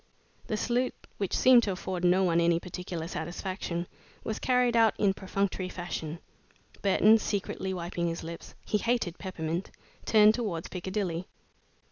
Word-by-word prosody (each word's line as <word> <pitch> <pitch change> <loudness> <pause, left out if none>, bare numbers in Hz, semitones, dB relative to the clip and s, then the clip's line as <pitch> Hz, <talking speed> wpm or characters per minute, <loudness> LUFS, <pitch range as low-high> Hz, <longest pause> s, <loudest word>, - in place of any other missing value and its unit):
The 215 - -1
salute, 245 +3 0 0.2
which 195 -3 0
seemed 255 -2 +7
to 210 - -1
afford 185 -1 -4
no 180 +2 +4
one 170 -2 +3
any 170 0 +3
particular 175 -2 -5
satisfaction, 175 +1 -4 0.4
was 220 - -3
carried 250 -2 +2
out 225 -2 +5
in 200 -2 +3
perfunctory 190 -1 -2
fashion. 170 -3 -5 0.6
Burton, 210 +3 +5
secretly 195 -2 -2
wiping 175 -1 -2
his 165 0 -3
lips 165 +1 -8
he 210 - +1
hated 230 -7 0
peppermint 175 -2 -3 0.4
turned 215 -1 +7
towards 205 -9 -3
Piccadilly. 185 -1 -3
185 Hz, 140 wpm, -29 LUFS, 170-210 Hz, 0.6 s, seemed